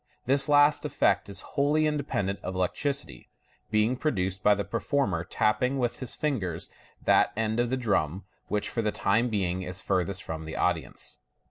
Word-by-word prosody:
This 140 +3 +4
last 145 0 +5
effect - - +1
is 100 -1 -3
wholly 150 +2 +2
independent 140 -10 -1
of 95 - -5
electricity, 95 - -2 0.4
being 110 +3 +2
produced 95 - -1
by 105 +1 +5
the 100 - -2
performer 105 - 0
tapping 110 +8 +1
with 120 -2 -1
his 130 - -3
fingers 100 - -2 0.3
that - - +4
end 110 +1 0
of 120 0 +1
the 130 - 0
drum 100 - 0 0.2
which 105 -1 -1
for 115 - -2
the 105 -1 0
time 110 +6 +1
being 95 -4 -1
is 90 +1 -5
farthest 95 0 -1
from 80 0 -5
the 80 - -6
audience. - - -1
105 Hz, 165 wpm, -28 LUFS, 95-130 Hz, 0.4 s, last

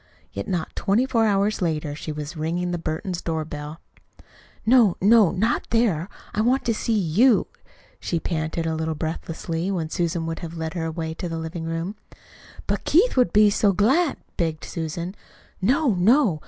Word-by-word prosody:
Yet 100 - -5
not 175 -4 -3
twenty 210 +6 +2
four 230 -4 +2
hours 200 +1 +1
later 155 -4 -1
she 155 +1 -6
was 150 +1 -6
ringing 170 +3 -2
the 175 - -2
Burtons' 170 +3 -3
doorbell. 155 -1 -4 0.9
"No, 225 -5 +5
no 210 -1 +6
not 215 +7 0
there! 205 -7 +1 0.2
I 215 - +1
want 250 +4 +2
to 230 - +2
see 220 +1 0
YOU," 210 +7 +4 0.5
she 170 - -2
panted 160 0 -2
a 160 - 0
little 160 0 -2
breathlessly, 165 +2 -3
when 165 -5 -2
Susan 170 -2 -1
would 165 0 -4
have 170 0 -7
led 160 0 -3
the 165 -2 -2
way 160 0 -4
to 175 +2 -5
the 165 - -3
living 160 +1 -5
room. 165 +5 -3 0.7
"But - - -1
Keith 400 +11 +3
would 250 -2 +3
be 210 0 +5
so 200 -1 +3
glad 270 - +2
" - - -42
begged 160 -2 -1
Susan. 170 +2 -4 0.5
"No, 260 - +3
no! 195 - +3
175 Hz, 175 wpm, -24 LUFS, 160-215 Hz, 0.9 s, no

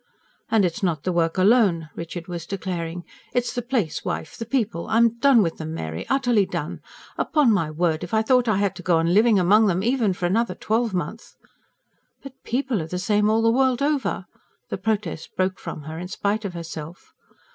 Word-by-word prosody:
"And 220 -3 +3
it's 170 +3 -2
not 165 -6 0
the 185 - 0
work 165 0 0
alone," 185 -6 +3
Richard 165 +1 -6
was 175 -2 -6
declaring, 175 -3 -4 0.3
"it's 245 -1 0
the 245 - -2
place, 235 - -1
wife 155 - -4
the 230 - -6
people. 225 -9 -1
I'm 230 +1 +3
done 255 -4 +5
with 165 -2 -3
'em, 160 0 -5
Mary 80 - -5
utterly 245 -7 +2
done! - - -4 0.4
Upon 295 -6 +3
my 175 -7 +1
word, 160 +1 0
if 175 - -7
I 220 0 +2
thought 250 +1 +3
I 215 -3 +2
had 200 -1 0
to - - -7
go 175 -1 +2
on 165 +1 +1
living 215 +1 +5
among 205 +4 +5
them 185 0 +1
even 235 -4 +2
for 180 - -3
another 220 +6 +1
twelvemonth 220 -1 -2 0.4
..." - - -44
"But 275 -2 -9
PEOPLE 250 -4 -1
are 160 - -5
the 180 - -4
same 210 +3 +2
all 225 +1 +2
the 230 - +4
world 260 +1 +2
over!" 290 -1 0 0.4
The - - -4
protest 205 -7 -3
broke 185 0 0
from 150 - -7
her 160 +2 -7
in 180 - -5
spite 205 +3 -2
of 185 -3 -5
herself. 165 0 -8
200 Hz, 200 wpm, -23 LUFS, 170-230 Hz, 0.4 s, done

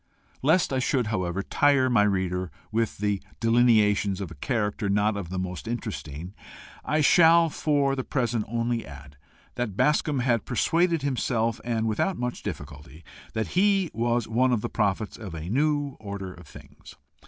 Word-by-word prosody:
Lest 155 +2 +3
I 130 - +1
should, 130 -1 +1
however, 95 -1 -1
tire 140 +1 +3
my 120 -4 +3
reader 95 -3 0 0.2
with 115 0 -1
the 105 -1 -1 0.2
delineations 110 -4 +3
of 95 -5 -5
a - - -7
character 105 - -2
not 105 +1 +2
of 100 -4 -5
the 95 - -4
most 90 +3 -5
interesting, 90 - -5 0.5
I 155 0 +1
shall, 165 +2 +6
for 140 -3 +1
the 130 - -3
present, 120 -6 -1
only 115 +1 -1
add 70 0 -12 0.4
that 110 -6 -3
Bascombe 145 0 +2
had 120 -4 +1
persuaded 165 +5 +1
himself, 120 -4 -1
and 115 -2 -1
without 115 - 0
much 125 0 -3
difficulty, 75 +3 -8 0.3
that 110 -1 -2
he 195 -2 +2
was 120 0 0
one 125 +3 +2
of 120 -4 +1
the - - -3
prophets 105 -1 -1
of 100 -7 -8
a 80 +2 -6
new 145 +1 0
order 100 -3 -6
of 90 -2 -15
things. - - -14
115 Hz, 165 wpm, -26 LUFS, 100-130 Hz, 0.5 s, shall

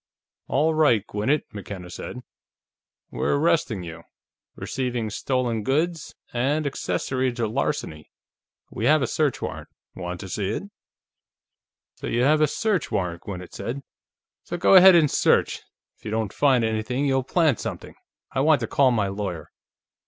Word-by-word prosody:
"All 155 +4 +2
right, 145 -10 +3
Gwinnett," 110 +10 0
McKenna 95 -3 -8
said. 125 - -7 0.9
"We're - - 0
arresting 145 - +1
you: 85 -1 -8 0.5
receiving 125 -4 -3
stolen 120 -1 -1
goods, 155 +7 -1 0.2
and 140 +6 0
accessory 130 -2 -1
to 120 -2 -1
larceny. 110 - -3 0.6
We 110 - -3
have 150 +1 +4
a - - +2
search 150 +2 0
warrant. - - -5 0.3
Want 90 -1 -5
to 95 - -7
see 95 +1 -2
it?" 110 - -3 1.3
"So - - -6
you 120 +1 +1
have 155 +3 +4
a 155 - +5
search 210 +1 -1
warrant," 90 -3 -2
Gwinnett 90 -3 -8
said. 120 +8 -5 0.6
"So 175 - -5
go 175 - +4
ahead 190 -1 +9
and 155 -4 +4
search; - - +2 0.4
if - - -30
you 110 - -5
don't 110 -2 -2
find 135 -5 +3
anything, 110 +5 -1
you'll 135 -1 +2
plant 150 - +1
something. - - -6 0.4
I 130 - -2
want 150 +1 +4
to 115 - -2
call 135 +3 +3
my 110 -5 +1
lawyer." 95 -4 -5
125 Hz, 150 wpm, -24 LUFS, 105-150 Hz, 1.3 s, ahead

